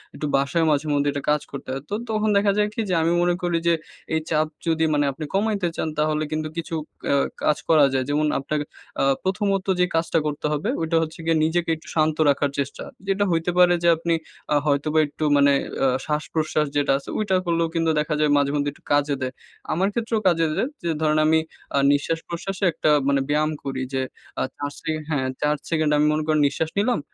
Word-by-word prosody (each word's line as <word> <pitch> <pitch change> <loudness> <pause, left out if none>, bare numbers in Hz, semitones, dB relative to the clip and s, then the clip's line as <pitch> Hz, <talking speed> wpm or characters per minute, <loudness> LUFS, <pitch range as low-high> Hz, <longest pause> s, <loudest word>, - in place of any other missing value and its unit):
একটু - - -4
বাসায় 140 +4 +1
মাঝেমধ্যেই 145 -1 +1
একটা 145 - -4
কাজ 150 -1 +2
করতে 140 - -8
হয়। 135 +1 -3
তো - - -5 0.2
তখন 215 0 +1
দেখা 200 0 +3
যায় 210 0 +3
কি? - - -7
যে - - +1
আমি 165 +1 +2
মনে 175 0 +2
করি 175 -1 0
যে, 170 - +5 0.4
এই 160 - +3
চাপ 155 -1 +2 0.2
যদি 160 -1 +2
মানে 145 -1 +2
আপনি 155 +3 -6
কমাইতে 200 -2 +1
চান, - - -2
তাহলে 155 0 +1
কিন্তু 155 0 -2
কিছু 165 0 -3 0.4
আ - - +4 0.3
কাজ 150 - +3
করা 155 -3 +6
যায়। 130 -1 +1
যেমন 150 +1 +1
আপনাকে 150 +2 -2 0.4
আ - - +3 0.2
প্রথমত 195 0 0
যে 180 - +5
কাজটা 165 0 +1
করতে 150 0 -4
হবে, 150 +9 -1
ওইটা 165 0 +1
হচ্ছে 160 +1 -7
গিয়ে 165 -1 +2
নিজেকে 170 +1 0
একটু 160 - -16
শান্ত 155 -1 +2
রাখার 140 0 +1
চেষ্টা। 140 0 -3 0.2
যেটা 195 +1 +1
হইতে 165 +1 +1
পারে 180 -1 +6
যে - - +3
আপনি 170 +1 0 0.4
আ - - +4
হয়তোবা 150 +2 +2
একটু 150 - -6
মানে 140 0 +5 0.3
আ - - +5 0.2
শ্বাস-প্রশ্বাস 155 0 0
যেটা 145 - +2
আছে, 140 - -10
ওইটা 205 -3 +1
করলেও 170 -1 +1
কিন্তু 165 -1 +1
দেখা 150 +1 -1
যায় 150 -1 +3
মাঝেমধ্যে 145 0 +1
একটু - - -23
কাজে 145 0 +2
দেয়। 130 0 -2 0.4
আমার 185 +4 +1
ক্ষেত্রেও 225 -1 -1
কাজে 165 -2 +3
দেয়। 255 - 0
যে 170 - -1
ধরেন 155 -1 +2
আমি 160 0 +4 0.4
আ - - +3
নিঃশ্বাস 145 +3 0
প্রশ্বাসে 185 +3 -4
একটা 155 - 0 0.2
মানে 140 -1 +3
ব্যায়াম 155 +1 +2
করি। 135 -1 -3
যে 135 - 0 0.4
আ - - 0 0.2
৪ 145 0 -3
সে 160 - -3 0.2
হ্যাঁ, 140 -4 0
৪ 150 0 +2
সেকেন্ড 155 -2 +1
আমি 150 - +3
মনে 155 0 0
করে 155 -1 +3
নিঃশ্বাস 155 +3 -2
নিলাম। 230 +3 +1
155 Hz, 210 wpm, -23 LUFS, 145-170 Hz, 0.4 s, করা